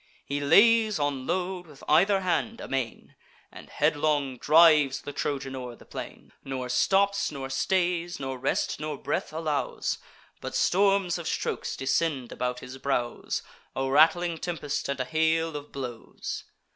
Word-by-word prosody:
He 140 +1 -2
lays 215 +8 +5
on 145 -3 -2
load 180 0 -2
with 145 -3 -15
either 190 +6 +4
hand, 185 +6 -1
amain, 130 -4 -4 0.4
And - - -12
headlong 145 -3 +1
drives 150 -4 +5
the 145 - -6
Trojan 135 -2 -3
o'er 125 -2 -6
the - - -17
plain; - - -9
Nor 130 -2 -4
stops, 195 +10 +2
nor 135 -2 -6
stays; 175 +3 0
nor 135 -1 -4
rest 135 - -1
nor 150 -1 -4
breath - - -2
allows; 155 -2 -2 0.4
But - - -6
storms 195 -2 +2
of 170 - -5
strokes - - -2
descend 135 -1 0
about 125 0 -3
his 130 +1 -9
brows, 125 -3 -2 0.3
A 135 0 -1
rattling 165 +3 +4
tempest, 150 -5 -3
and 140 -1 -2
a 130 - 0
hail 160 +3 +1
of 145 0 -7
blows. 125 -4 -6
150 Hz, 145 wpm, -27 LUFS, 135-175 Hz, 0.4 s, lays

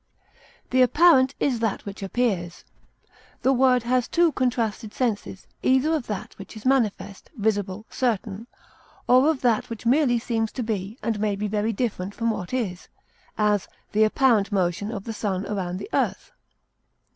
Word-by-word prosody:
The 255 0 +4
apparent 270 0 +5
is 255 -5 +1
that 225 -3 -2
which 200 0 -7
appears; 195 -4 -2 0.8
the 265 - +4
word 255 -2 +3
has 250 0 +1
two 340 -1 +3
contrasted 230 -5 -1
senses, 215 -6 -2 0.2
either 265 +5 +3
of 300 -6 -2
that 210 -3 -5
which 195 +3 -10
is 215 - -12
manifest, 225 -6 0
visible, 205 -1 -1
certain, 225 -3 -2 0.6
or 255 +4 +5
of 310 -5 0
that 235 -4 +1
which 230 0 -7
merely 250 0 +3
seems 225 -1 -1
to 250 - -3
be 215 0 -3
and 225 -2 -1
may 210 -1 0
be 210 +1 -2
very 210 +2 0
different 205 -4 -3
from 230 -1 0
what 185 -5 -5
is; 210 -9 -3 0.5
as, 210 -2 +1 0.2
the 215 +1 +3
apparent 220 -2 +3
motion 190 +2 0
of 200 -4 -5
the 225 - -5
sun 200 -3 -2
around 185 -3 -3
the 300 - -7
earth. - - -1
225 Hz, 160 wpm, -24 LUFS, 205-255 Hz, 0.8 s, apparent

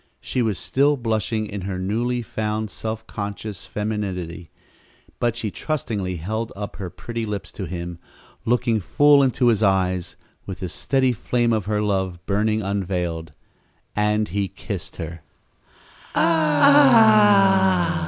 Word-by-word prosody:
She 125 - -2
was 110 -5 0
still 140 +8 +2
blushing 110 -2 -1
in 100 -1 -6
her 95 0 -4
newly 120 +6 -1
found 110 -1 -3
self 110 0 -5
conscious 100 -1 -6
femininity, 95 -6 -4 0.7
but 120 -2 0
she 110 -3 -3
trustingly 105 - -3
held 110 +7 -3
up 100 0 -6
her 95 -3 -5
pretty 115 +5 -6
lips 105 -2 -5
to 95 - -6
him, 85 0 -6 0.4
looking 120 -1 +1
full 145 - +4
into 130 -2 +3
his 110 -2 +2
eyes 95 -3 +1 0.3
with 95 - -7
the 90 - -3
steady 130 - +1
flame 120 +1 0
of 110 -4 -1
her 105 0 0
love 95 -3 -1
burning 110 +2 0
unveiled 90 -5 -2 0.6
and 105 0 +1
he 100 +2 -1
kissed 95 -1 -7
her. 85 -1 -7
105 Hz, 130 wpm, -22 LUFS, 95-115 Hz, 0.7 s, full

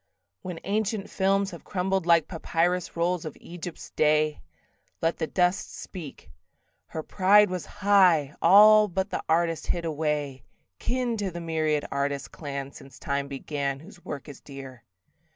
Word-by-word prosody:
When 180 -3 -6
ancient 210 0 -2
films 195 +1 +1
have - - -10
crumbled 190 -1 -1
like 165 -3 +5
Papyrus 175 +1 -1
rolls 175 0 0
of 155 - -7
Egypt's 175 -1 -9
day, 155 0 +2 0.6
Let 165 +1 0
the 160 - -1
dust 180 +2 0
speak: 155 - -9 0.6
"Her 160 - -5
pride 205 +2 +4
was 180 -2 -4
high, 185 -8 +3
All 210 +4 +8
but 190 +1 -2
the - - -2
artist 165 0 +1
hid 170 -1 -1
away: 150 -4 -2 0.4
"Kin 245 -2 -1
to 200 -2 -2
the 175 -1 -7
myriad 155 -3 0
artist 140 0 -2
clan 140 -2 -6
Since 135 -3 -14
time 140 0 -2
began, 140 0 -3
whose 175 +3 -15
work 145 -1 -7
is 145 -3 -11
dear." 135 -3 -10
165 Hz, 150 wpm, -26 LUFS, 150-190 Hz, 0.6 s, All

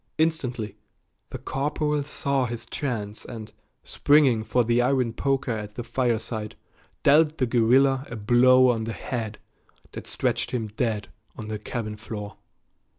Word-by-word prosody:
Instantly 125 -10 -1 0.5
the - - -6
corporal 150 +1 -1
saw 140 -2 -1
his 115 0 -6
chance 110 -7 -4
and, 110 -3 -8 0.3
springing 140 -7 +3
for 125 +2 +2
the 120 +1 +2
iron 125 -2 +1
poker 135 0 0
at 105 -2 -5
the 120 - -4
fireside, 115 -3 -2 0.5
dealt 150 +2 +5
the 130 - +2
guerrilla 130 +3 +3
a 120 - -6
blow 125 +4 +5
on 110 -2 -2
the 115 - -4
head 110 -4 -4 0.5
that - - -8
stretched - - -1
him 120 -3 -2
dead 105 -2 -2 0.3
on 110 -1 -7
the 110 -1 -3
cabin 110 -2 -5
floor. 105 -2 -7
120 Hz, 145 wpm, -25 LUFS, 110-135 Hz, 0.5 s, dealt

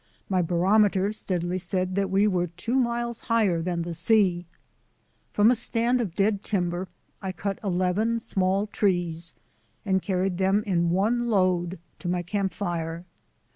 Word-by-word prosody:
My 185 -2 +2
barometer 195 +3 +2
steadily 180 -3 -2
said 185 0 -2
that 195 0 0
we 195 +2 +3
were 180 -4 +1
two 180 +8 -5
miles 235 -2 -1
higher 215 -8 +2
than 170 0 -2
the 170 0 -5
sea. 180 -1 +2 0.8
From 210 +3 +5
a - - +3
stand 235 +2 +1
of 185 -7 -4
dead 200 0 +1
timber 180 -3 -2 0.3
I 190 - -3
cut 195 +2 -4
eleven 195 +5 0
small 195 -1 0
trees 175 -5 -1 0.5
and 190 -1 +1
carried 185 -1 -1
them 195 +2 +2
in 175 -4 +1
one 220 +7 +1
load 185 -3 +1 0.2
to 180 - -6
my 175 0 0
camp 195 +1 -1
fire. 170 -2 -4
190 Hz, 150 wpm, -26 LUFS, 175-210 Hz, 0.8 s, From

